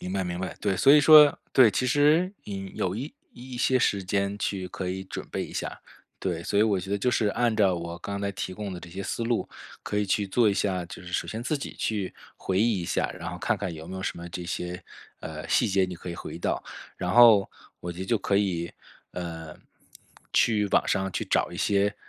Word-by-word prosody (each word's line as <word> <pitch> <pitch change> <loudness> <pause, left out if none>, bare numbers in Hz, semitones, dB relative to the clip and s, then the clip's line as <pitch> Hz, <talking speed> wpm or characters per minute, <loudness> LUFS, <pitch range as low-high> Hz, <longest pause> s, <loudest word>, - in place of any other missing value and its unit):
明 90 - -5
白 95 - 0
明 90 0 -4
白， 95 0 -4
对。 100 -2 0
所 135 +9 +6
以 150 - +8
说 150 -1 +8
对， 125 -4 +7
其 125 +5 0
实 150 +8 +3
引 95 -2 -6
有 90 0 -1
一 135 +7 -6 0.2
一 125 +1 -9
些 130 +1 +2
时 100 -5 +1
间 100 +2 -1
去 95 -3 -2
可 90 +1 -5
以 95 +1 -3
准 95 - -7
备 - - -2
一 - - -11
下， - - -4 0.4
对， 85 -3 -3
所 100 +3 0
以 105 - +6
我 105 -3 +2
觉 95 +2 -7
得 100 - 0
就 125 +5 +1
是 110 -3 +1
按 120 +2 +1
照 100 -4 +3
我 85 0 -5
刚 100 +2 -5
才 100 0 -1
提 95 - -4
供 100 0 -5
的 - - -6
这 85 - -11
些 95 +3 -6
思 115 - -3
路 115 0 0 0.3
可 105 - -4
以 105 - +1
去 100 +1 0
做 110 +3 +3
一 - - +1
下。 95 -3 -1
就 85 - -10
是 90 -1 -10
首 - - 0
先 110 +2 -5
自 150 +5 -1
己 140 - -6
去 105 -4 -2 0.2
回 95 -1 -1
忆 110 -2 +2
一 - - -4
下， - - -1
然 85 +1 -5
后 90 - -7
看 120 +5 0
看 100 -3 -4
有 80 0 -9
没 95 - -6
有 95 - -5
什 - - -3
么 85 0 -7
这 90 +1 -6
些， 90 +1 -4 0.4
呃， 80 0 -7
细 120 - +3
节， 95 -2 +2
你 90 - -6
可 90 +1 -8
以 - - -5
回 - - -8
忆 - - -7
到。 - - -1 0.4
然 90 -1 -2
后 115 -3 +7 0.3
我 90 - -5
觉 85 +1 -8
得 - - -2
就 115 +3 +1
可 100 0 0
以， 90 -4 0 0.4
呃， 80 -3 -6 0.8
去 105 -3 +3
网 - - +3
上 95 0 0
去 - - -3
找 - - +1
一 85 - -8
些 100 +1 +1
100 Hz, 265 characters per minute, -27 LUFS, 90-110 Hz, 0.8 s, 以